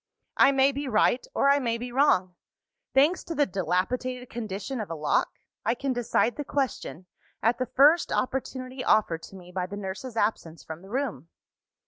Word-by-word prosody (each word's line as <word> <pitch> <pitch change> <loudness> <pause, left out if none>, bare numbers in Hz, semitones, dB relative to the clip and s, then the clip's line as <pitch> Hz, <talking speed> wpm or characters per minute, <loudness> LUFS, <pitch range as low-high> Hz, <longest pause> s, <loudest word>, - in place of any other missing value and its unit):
"I - - +7
may 270 0 +4
be 280 +1 -4
right 240 +1 +2
or - - +3
I 285 - +4
may 235 -3 -1
be 245 +1 -6
wrong. 240 -9 +3 0.6
Thanks 295 +7 +4
to 330 - -5
the 290 0 +3
dilapidated 245 +7 -2
condition 220 +2 -4
of 210 - -6
a 165 - -4
lock, 150 -1 0 0.3
I 230 +3 +1
can 270 +1 -2
decide 245 0 +1
the 295 - -2
question, 265 - -3 0.4
at 230 +3 +2
the 255 - -1
first 290 +7 +4
opportunity 255 0 -3
offered 170 -6 +2
to 180 - -12
me 180 -1 -12
by 180 0 -2
the 200 +2 -7
nurse's 205 +5 -6
absence 170 -8 -1
from 160 +1 -8
the 195 - -14
room. 230 - -3
240 Hz, 180 wpm, -27 LUFS, 190-265 Hz, 0.6 s, I